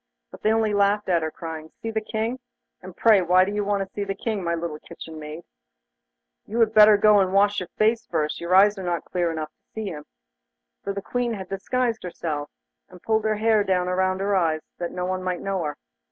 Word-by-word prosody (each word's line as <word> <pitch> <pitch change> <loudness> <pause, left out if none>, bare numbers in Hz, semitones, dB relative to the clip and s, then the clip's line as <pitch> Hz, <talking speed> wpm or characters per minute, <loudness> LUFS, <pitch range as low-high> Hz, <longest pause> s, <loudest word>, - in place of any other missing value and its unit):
But - - -12
they 215 - +2
only 220 -1 +2
laughed 205 0 +2
at 170 -2 +3
her, 160 - -1
crying: 160 -1 -7
'See 225 +6 -7
the 220 0 -1
King? 225 +3 -3 0.4
And 185 -2 -11
pray, 215 -4 +5
why 180 +1 +4
do 200 - -3
you 205 0 -1
want 200 -1 0
to 195 - -14
see 205 - -2
the 195 0 -3
King, 210 -1 -3
my 170 0 0
little 165 -2 -4
kitchen 160 -1 -10
maid? 155 +2 -8 1.0
You 225 +3 -3
had 225 -1 +3
better 210 -1 +8
go 210 0 +5
and 190 -1 +2
wash 205 +1 +3
your 180 - -6
face 225 +2 +2
first, 155 -3 -2
your 170 +2 +1
eyes 205 +1 +5
are - - -5
not 175 -1 -2
clear 175 -2 -1
enough 155 -1 -4
to - - -55
see 220 -2 -3
him!' 150 -4 -8 0.8
For 200 - -2
the 200 0 -5
Queen 245 -2 -1
had 190 -2 -8
disguised 230 +4 -1
herself, 155 -4 -4 0.4
and 180 - -14
pulled 220 -1 +1
her 215 0 +2
hair 215 0 +3
down 185 -2 +1
about 185 +1 0
her 200 0 +1
eyes, 160 -4 +1 0.2
that 175 - -3
no 180 0 -3
one 185 0 -2
might 185 -1 -2
know 195 -2 -2
her. 150 -1 -4
195 Hz, 230 wpm, -24 LUFS, 175-215 Hz, 1.0 s, better